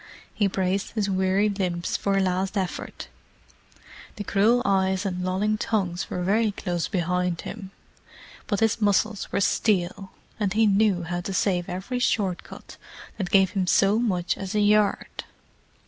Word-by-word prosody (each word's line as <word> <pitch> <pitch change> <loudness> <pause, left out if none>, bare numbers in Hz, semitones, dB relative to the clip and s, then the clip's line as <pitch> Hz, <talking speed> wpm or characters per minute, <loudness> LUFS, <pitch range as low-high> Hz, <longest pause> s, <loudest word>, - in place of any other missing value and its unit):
He 205 - +1
braced 190 +1 -1
his 205 -3 -1
weary 190 +2 +2
limbs 180 -4 -2
for 200 -1 0
a - - +3
last 190 +2 -1
effort. 185 -2 -4 1.1
The 205 - -5
cruel 220 +5 +3
eyes 190 0 +1
and 180 -2 -2
lolling 205 +4 0
tongues 185 -5 -1
were 180 - -3
very 215 +4 +2
close 175 -4 -2
behind 180 -2 -1
him; 195 -2 -8 0.8
but 205 -1 -1
his 225 0 +2
muscles 205 0 +1
were - - 0
steel, 190 -2 0 0.3
and 205 -2 0
he 220 +1 +3
knew 200 -3 +3
how 175 +1 -3
to 195 +2 -5
save 180 -2 0
every 190 +8 -3
short 195 -7 0
cut - - -12 0.4
that 185 -3 -2
gave 195 -2 +4
him 190 -3 -1
so 195 +4 +3
much 185 -7 0
as 195 +1 -5
a - - +3
yard. 210 0 +1
195 Hz, 160 wpm, -25 LUFS, 180-210 Hz, 1.1 s, gave